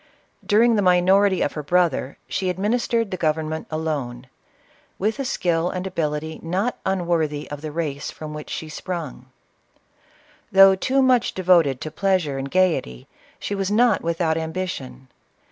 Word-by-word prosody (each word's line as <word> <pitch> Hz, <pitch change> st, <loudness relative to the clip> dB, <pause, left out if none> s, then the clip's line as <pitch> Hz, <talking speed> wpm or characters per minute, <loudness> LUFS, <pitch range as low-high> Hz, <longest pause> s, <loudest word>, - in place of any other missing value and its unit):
Dur 210 Hz, +3 st, +4 dB
ing 235 Hz, -2 st, +4 dB
the -, -, +3 dB
minority 190 Hz, +1 st, +4 dB
of -, -, -2 dB
her 150 Hz, -, -4 dB
brother, 160 Hz, -4 st, 0 dB
she 190 Hz, -1 st, -2 dB
administered 225 Hz, +3 st, 0 dB
the 185 Hz, -, -2 dB
government 160 Hz, -1 st, -1 dB
alone, 145 Hz, -6 st, -3 dB, 0.7 s
with 215 Hz, +6 st, -1 dB
a -, -, 0 dB
skill 175 Hz, -6 st, 0 dB
and 185 Hz, 0 st, -4 dB
ability 160 Hz, -3 st, -3 dB
not 190 Hz, +9 st, -2 dB
unwor 175 Hz, -4 st, +1 dB
thy 145 Hz, 0 st, -6 dB
of 145 Hz, -1 st, -6 dB
the 155 Hz, -1 st, -5 dB
race 145 Hz, -3 st, -3 dB
from 155 Hz, -1 st, -8 dB
which 150 Hz, 0 st, -8 dB
she 160 Hz, -, -5 dB
sprung. 155 Hz, -6 st, -6 dB, 1.2 s
Though 195 Hz, 0 st, +8 dB
too 265 Hz, +8 st, +1 dB
much 255 Hz, -3 st, +2 dB
devoted 170 Hz, -8 st, +3 dB
to 155 Hz, -, -5 dB
pleasure 180 Hz, -9 st, 0 dB
and 135 Hz, +1 st, -4 dB
gayety, 165 Hz, -, 0 dB, 0.3 s
she -, -, -4 dB
was 195 Hz, -1 st, -1 dB
not 225 Hz, 0 st, +3 dB
without 165 Hz, -1 st, 0 dB
ambition. 160 Hz, -6 st, -5 dB
175 Hz, 155 wpm, -22 LUFS, 155-190 Hz, 1.2 s, Though